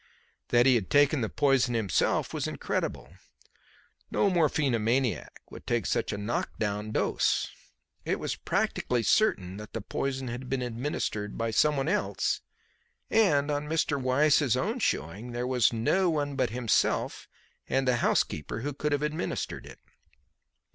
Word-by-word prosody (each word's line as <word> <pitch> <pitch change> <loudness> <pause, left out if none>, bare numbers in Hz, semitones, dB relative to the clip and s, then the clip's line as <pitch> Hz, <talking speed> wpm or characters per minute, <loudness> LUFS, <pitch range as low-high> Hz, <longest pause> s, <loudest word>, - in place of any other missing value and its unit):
That 120 0 +4
he 135 - +6
had 110 -7 0
taken 145 -1 +4
the 110 - -1
poison 135 -4 +2
himself 110 -4 +1
was - - -2
incredible. - - -3 0.9
No 200 - +2
morphinomaniac 135 -7 0
would - - -11
take - - 0
such - - 0
a 105 - -3
knock 105 +3 -3
down 105 0 -2
dose. - - +1 0.5
It - - -1
was - - -2
practically 120 -2 -1
certain 100 - +2
that 105 0 -10
the - - -2
poison 135 +4 -3
had 125 +2 -6
been 130 -1 -1
administered 115 -4 -3
by 115 0 -1
someone 145 +3 +2
else, 170 - 0 0.7
and, 150 -10 +3
on 145 0 -2
Mr. 150 -3 0
Weiss's 135 0 +3
own 220 - -1
showing, 110 - -2
there 120 +1 -2
was 125 -2 +3
no 175 +11 +2
one 145 -3 -1
but 130 -2 +1
himself 120 -1 0 0.4
and 135 0 +1
the 125 -1 +3
housekeeper 80 -3 0
who 145 +3 -3
could 150 +2 -1
have 145 +1 0
administered 150 +3 -3
it. - - -12
130 Hz, 150 wpm, -28 LUFS, 115-145 Hz, 0.9 s, he